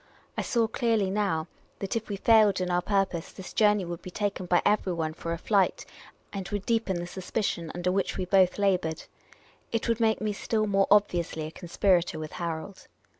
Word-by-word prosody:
I - - -1
saw 235 -3 +1
clearly 220 -4 +1
now 190 -6 0 0.3
that 195 +2 -3
if 225 -1 -3
we 205 - -2
failed 215 -2 +5
in 180 -1 -1
our 175 0 +2
purpose 195 -3 -1
this 190 - -10
journey 210 -3 +3
would 170 -1 -6
be - - -8
taken 195 -1 -3
by 175 0 +3
everyone 175 -6 +1
for 165 +1 -5
a 170 - -1
flight, 195 +2 +1 0.5
and 195 -1 -5
would 205 -1 -3
deepen 225 -6 0
the 175 - -4
suspicion 180 -2 -3
under 175 +1 0
which 195 0 -1
we 185 - -1
both 185 -1 +4
laboured. 180 -5 0 0.7
It 230 - -1
would 230 -1 +1
make 220 -1 +2
me 215 -1 -1
still 215 +2 -1
more 195 -1 +2
obviously 175 -6 +2
a 155 - -6
conspirator 175 -1 +1
with 155 -1 -6
Harold. 170 +3 -5
190 Hz, 190 wpm, -28 LUFS, 175-210 Hz, 0.7 s, failed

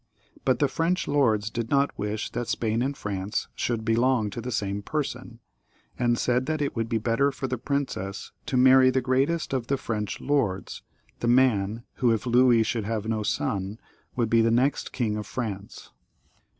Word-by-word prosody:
But 130 -2 +3
the 145 - +2
French 170 +5 0
lords 110 -7 +2
did 115 0 -3
not 140 0 +2
wish 105 +1 -3
that 120 0 -3
Spain 115 0 0
and 135 +2 -1
France 100 +1 -3
should 115 -2 -2
belong 115 -1 +2
to 120 - -5
the 125 +2 -5
same 100 -2 -2
person, 125 -2 -4 0.5
and 120 -1 +1
said 125 +2 +1
that 155 0 -1
it 145 -1 -2
would 115 -1 -2
be 115 - +1
better 115 +5 +1
for 135 - -5
the 125 -2 -2
princess 130 -9 -3 0.2
to 130 - 0
marry 130 0 +7
the 130 +1 +2
greatest 135 +6 0
of 125 -3 -1
the 140 - +1
French 105 -4 -3
lords, 115 -10 -1 0.4
the 120 - -1
man 115 -3 +3
who, 125 -3 +3
if 115 0 0
Louis 120 -1 +5
should 115 -2 -2
have 110 -1 -2
no 110 -1 -1
Son, 105 -2 -2 0.4
would 120 -2 +1
be 115 0 +5
the 115 - +3
next 125 +5 +1
King 110 -4 -1
of 105 -1 -5
France. 105 -5 -6
120 Hz, 185 wpm, -26 LUFS, 110-130 Hz, 0.5 s, marry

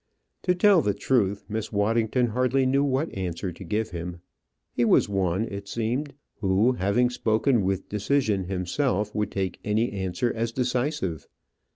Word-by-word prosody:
To 180 -1 +1
tell 190 -1 +5
the 100 -6 0
truth, 100 -3 +1
Miss 110 0 -4
Waddington 115 +3 +1
hardly 130 +3 +1
knew 135 +2 +3
what 140 +3 -1
answer 90 -1 -3
to 90 - -10
give 105 +5 -2
him. 85 0 -5 0.5
He 120 - +1
was 115 - +4
one, 95 0 0
it 100 -2 -7
seemed, 125 +7 -2 0.2
who, 100 +4 +3
having 120 +3 +1
spoken 115 +1 +2
with 95 0 -1
decision 105 -2 0
himself, 100 +4 -1
would 105 -1 -1
take 95 -2 -3
any 110 +3 +1
answer 100 +5 -1
as 115 0 -1
decisive. 125 - -1
110 Hz, 155 wpm, -26 LUFS, 95-125 Hz, 0.5 s, tell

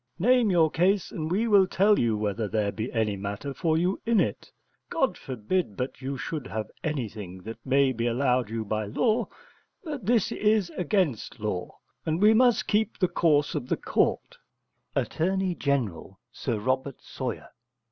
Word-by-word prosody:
Name 240 +4 +4
your 165 -4 +4
case, 190 +3 +2
and 155 -1 -4
we 210 +7 +1
will 200 -3 +5
tell 200 +3 +3
you 115 -3 +1
whether 105 +1 -1
there 105 -1 0
be 110 +4 -4
any 110 -3 0
matter 100 +7 -5
for 160 +1 +1
you 180 +4 0
in 230 -2 +3
it. 105 - -1 0.4
God - - +1
forbid 125 - -2
but 125 +1 -4
you 135 +1 -3
should 145 0 -4
have 110 -1 -4
anything 105 - -4
that 115 +1 -8
may 135 0 +3
be 115 -1 -1
allowed 125 -1 +1
you 110 -1 -3
by 110 +1 -2
law: 220 - +1 0.6
but 295 - -5
this 230 -3 +3
is 210 -4 +2
against 170 - -1
law, 100 -4 -4 0.3
and 160 +1 -1
we 210 +2 +6
must 245 +1 +4
keep 215 0 +1
the 185 - +2
course 150 -4 +2
of 125 - -3
the - - +1
court. - - 0 0.6
Att. - - -1 0.4
Gen. 115 - -1 0.2
(Sir 120 -2 -3
Robert 130 +4 -1
Sawyer). 125 -4 -5
140 Hz, 165 wpm, -27 LUFS, -, 0.6 s, we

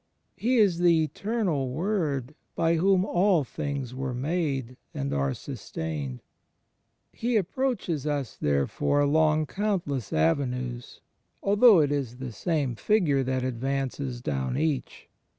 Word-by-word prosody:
He 250 +2 +1
is 195 -6 +4
the 170 -2 +4
Eternal 180 - -1
Word 150 - -1 0.2
by 165 0 +2
whom 190 +2 +3
all 180 -4 +3
things 135 -1 -4
were 130 -1 -3
made 135 -3 -2 0.2
and 70 +1 -2
are 70 -1 0
sustained 75 -6 -5 0.9
He 235 0 0
approaches 195 - -1
us 145 -5 -2
therefore 70 - +1
along 155 +1 +3
coimtless 170 - -2
avenues, 125 - -1 0.4
although 205 -2 +6
it 145 -1 +1
is 135 -5 -2
the 130 -2 -6
same 145 - -1
Figure 150 - +2
that 130 0 -1
advances 130 0 -2
down 70 - -2
each. 150 -3 -2
145 Hz, 120 wpm, -27 LUFS, 125-175 Hz, 0.9 s, although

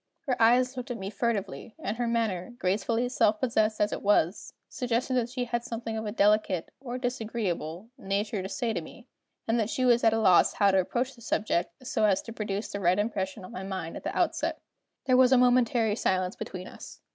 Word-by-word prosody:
Her 265 -6 -1
eyes 250 +3 +4
looked 250 -1 -6
at 245 - -3
me 195 -1 -5
furtively; 215 0 -3
and 225 -9 -4
her 240 -1 -1
manner, 230 -2 -1
gracefully 220 +6 0
self 215 -4 +2
possessed 220 -4 +1
as 210 - +1
it - - -4
was, 200 -3 +1 0.2
suggested 250 +1 -1
that 245 -2 +1
she 250 0 -3
had 235 0 -2
something 230 -2 -5
of 220 -1 -3
a - - -2
delicate, 205 -4 +2
or 250 -2 -5
disagreeable, 220 -7 -3
nature 200 -1 -2
to 190 - -5
say 230 +1 -2
to 175 - -2
me, 235 +9 -13 0.4
and 225 +1 +2
that 220 -1 0
she 255 - 0
was 240 -1 +4
at 225 - +5
a 225 - +1
loss 185 -5 +5
how 200 -1 +3
to 190 - +3
approach 245 +8 -1
the 235 - -18
subject 215 +3 -2
so 215 - +1
as 195 -2 +2
to 230 - -8
produce 210 -1 -4
the 200 - -4
right 180 -1 +3
impression 200 -2 -2
on - - -11
my 185 - -6
mind 190 -4 -5
at - - -8
the - - -3
outset. - - 0 0.5
There 255 -1 +4
was 255 0 +6
a 260 - +6
momentary 245 -3 +3
silence 185 -4 0
between 185 -1 -7
us. - - -11
220 Hz, 215 wpm, -28 LUFS, 195-245 Hz, 0.5 s, was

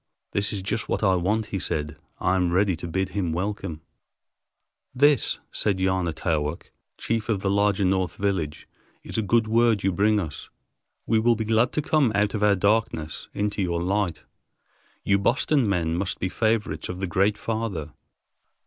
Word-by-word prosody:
"This 100 0 +1
is 100 -3 -3
just 110 +3 -2
what - - -1
I 95 -2 +4
want," 100 +5 +1
he 95 - 0
said. 75 -3 -3 0.2
"I 90 - +1
am 90 -2 +1
ready 95 +1 +2
to 85 +2 -7
bid 95 +3 -1
him 90 -3 -2
welcome." 90 -3 -3 1.1
"This," 145 0 +3
said 100 -3 0
Yana 95 -2 +1
Taowk, 80 -1 -2 0.3
chief 115 0 -2
of 105 -4 0
the 95 - 0
larger 100 -1 +2
north 95 -2 0
village, 90 -7 -2 0.4
"is - - -3
a - - +2
good 115 +2 +2
word 115 -2 +3
you 95 - +2
bring 105 +3 +2
us. 80 -7 -6 0.6
We 110 0 +2
will 120 +1 +3
be 110 0 -3
glad 115 +3 +2
to 150 - -1
come 150 -6 +2
out 105 0 +2
of 105 - -2
our 105 -1 +4
darkness 95 -4 0
into 105 0 -1
your 85 -2 -1
light. 90 -4 -1 0.8
You 100 0 +3
Boston 125 +3 +2
men 85 -4 0
must 95 +2 -2
be 95 - -2
favorites 110 +1 -1
of 90 - -5
the 95 - -1
Great 100 +4 +1
Father. 110 -9 -3
100 Hz, 175 wpm, -25 LUFS, 90-110 Hz, 1.1 s, I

